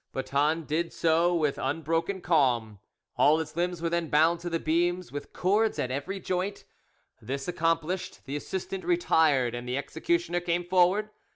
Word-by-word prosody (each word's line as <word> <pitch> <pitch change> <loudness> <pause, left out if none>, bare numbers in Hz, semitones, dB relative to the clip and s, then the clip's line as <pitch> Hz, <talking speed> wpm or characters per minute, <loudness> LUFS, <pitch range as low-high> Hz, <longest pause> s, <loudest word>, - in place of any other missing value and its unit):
Boeton 145 +4 0
did 165 +3 -1
so 170 +2 +2
with 150 -4 0
unbroken 165 +7 -1
calm. 125 - +1 0.4
All 155 +2 +5
his 155 -1 -5
limbs 175 0 -2
were 165 - +1
then 170 -1 0
bound 160 +3 +3
to 175 +1 -5
the 165 -1 -1
beams 175 +3 0
with 145 - -7
cords 210 +4 +1
at 125 - -2
every 180 +9 -3
joint; 185 +2 -3 0.6
this 135 +5 -4
accomplished, 165 +1 -1
the 140 +1 -5
assistant 190 +5 -4
retired, 160 - +2
and 120 0 -5
the 125 - -1
executioner 170 +4 -1
came 175 0 -1
forward. 185 +4 +3
165 Hz, 160 wpm, -28 LUFS, 145-175 Hz, 0.6 s, All